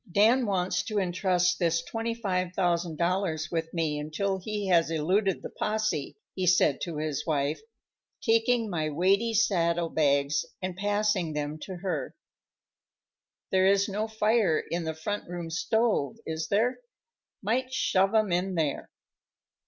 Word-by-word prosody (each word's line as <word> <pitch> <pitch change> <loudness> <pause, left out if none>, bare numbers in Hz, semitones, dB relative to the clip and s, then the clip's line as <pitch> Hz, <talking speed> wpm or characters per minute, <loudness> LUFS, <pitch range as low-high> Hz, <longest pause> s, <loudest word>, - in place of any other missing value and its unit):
"Dan 225 +6 +4
wants 185 -1 0
to 215 - -3
entrust 180 -1 +1
this 170 -2 +1
$25,000 180 -6 -1
with 165 -1 -2
me 160 -3 -1
until 190 +6 -2
he 210 +2 -4
has 170 -2 +4
eluded 185 +5 +1
the - - -6
possè," 215 -9 -1 0.2
he 185 -1 -2
said 175 -5 +3
to 170 -4 -4
his 150 -2 -2
wife, 145 0 0 0.6
taking 230 0 +2
my 160 -6 -1
weighty 195 +9 +2
saddle 170 -6 +2
bags 140 -2 +2 0.2
and 185 -1 -4
passing 205 -3 0
them 150 +1 -3
to 185 +4 -7
her. 185 +1 -3 1.4
"There 190 0 +4
is 200 0 +3
no 210 +2 -2
fire 215 -5 +2
in 170 -1 -1
the 160 0 -3
front 205 +5 -4
room 175 -2 -5
stove, 220 0 +1
is 160 0 -3
there? 225 +7 +1 0.6
Might 255 +5 0
shove 195 -4 +2
'em 215 -3 +3
in 180 +2 0
there." 155 -4 -1
185 Hz, 135 wpm, -28 LUFS, 165-210 Hz, 1.4 s, Dan